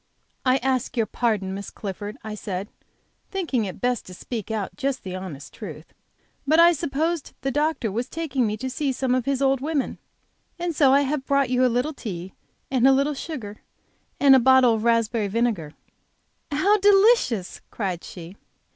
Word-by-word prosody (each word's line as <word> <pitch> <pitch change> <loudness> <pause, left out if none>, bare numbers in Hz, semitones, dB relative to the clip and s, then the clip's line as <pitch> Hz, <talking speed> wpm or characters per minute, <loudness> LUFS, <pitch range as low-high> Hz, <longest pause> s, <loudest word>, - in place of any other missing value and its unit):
"I 255 0 +4
ask 260 -1 -1
your 225 - +3
pardon, 215 -5 -1
Miss 200 +1 -6
Clifford," 205 +1 -6
I 215 0 -5
said, 200 -1 -5 0.6
thinking 320 - -1
it 185 - -7
best 245 -2 0
to 180 - -9
speak 225 +1 -6
out 215 -3 -3
just 275 -2 -2
the 185 -1 -5
honest 180 -7 -8
truth, - - -9 0.5
"but 315 +3 +4
I 340 +1 +8
supposed 320 0 -2
the 270 - -1
doctor 295 -6 0
was 235 +5 -3
taking 285 -7 -1
me 210 0 -2
to 260 - -4
see 270 +2 -1
some 255 0 0
of 255 -2 0
his 275 -1 0
old 270 -1 +2
women, 295 -1 -2 0.6
and 345 -2 -3
so 275 -3 +5
I 280 +1 +5
have 280 0 -2
brought 275 -2 +2
you 255 0 +3
a - - +6
little 250 +6 0
tea, 190 -8 -7 0.4
and 260 -1 +4
a - - +7
little 275 +3 +2
sugar, 255 -9 -6 0.6
and 275 -1 +7
a - - +6
bottle 260 -1 +5
of 220 -1 -2
raspberry 230 -2 +2
vinegar!" 200 -8 -1 0.8
"How 375 +9 +3
delicious!" 395 - +3
cried 185 -5 -3
she. 175 +1 -10
255 Hz, 180 wpm, -24 LUFS, 210-280 Hz, 0.8 s, I